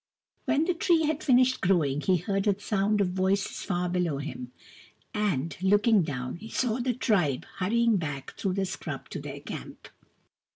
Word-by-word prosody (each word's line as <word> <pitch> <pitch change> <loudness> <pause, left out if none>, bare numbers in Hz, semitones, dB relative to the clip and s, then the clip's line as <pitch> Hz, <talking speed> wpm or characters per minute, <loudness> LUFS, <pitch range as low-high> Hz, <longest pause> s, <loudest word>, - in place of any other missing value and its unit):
When 300 +2 +2
the 360 - +1
tree 335 -1 +2
had 310 0 -1
finished 255 -1 +4
growing, 150 -6 +2
he 185 +2 +3
heard 195 +4 -1
a 200 -1 +2
sound 205 0 +1
of 190 - +2
voices 190 +2 0
far 180 -1 -1
below 175 -4 0
him, 125 -3 -6 0.6
and, 175 -8 -1
looking 205 +2 +4
down, 130 -4 -4
he 220 +5 -10
saw 245 -1 0
the 250 0 0
tribe 180 - +1
hurrying 230 +3 +3
back 145 -6 -5
through 190 - -1
the 195 0 0
scrub - - -6
to - - -5
their - - -7
camp. - - -8
195 Hz, 170 wpm, -28 LUFS, 175-225 Hz, 0.6 s, finished